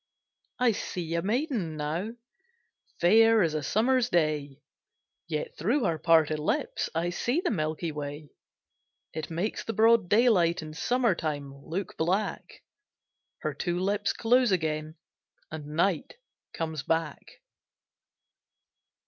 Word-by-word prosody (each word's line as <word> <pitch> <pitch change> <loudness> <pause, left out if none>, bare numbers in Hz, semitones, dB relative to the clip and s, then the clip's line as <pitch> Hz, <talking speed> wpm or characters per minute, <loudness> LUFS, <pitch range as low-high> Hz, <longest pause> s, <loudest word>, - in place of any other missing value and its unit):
I 250 -2 +3
see 175 -5 -4
a 170 - +1
maiden 215 - -1
now, 165 +9 -3 0.9
Fair 225 +4 +6
as 160 -2 0
a 155 - -1
summer's 240 - +2
day; 150 - 0 0.6
Yet 155 -3 -4
through 235 - +1
her 165 -4 0
parted 160 -2 +3
lips 230 - -1
I 170 +2 0
see 245 - 0
the - - 0
milky 160 -2 -2
way; 145 0 -6 0.8
It 155 - -5
makes 175 +6 -2
the 225 - -4
broad 225 -4 +4
daylight 200 -8 +3
In 155 0 -8
summer 240 +5 +1
time 145 -4 -4
look 165 +7 -6
black: 185 +6 -2 0.8
Her - - -2
two 175 -1 -2
lips 200 +2 0
close 245 0 +3
again, 155 -3 -1 0.6
And 150 -2 -7
night 175 - 0 0.4
comes 160 -3 -3
back. 165 +1 -1
170 Hz, 125 wpm, -28 LUFS, 155-220 Hz, 0.9 s, Fair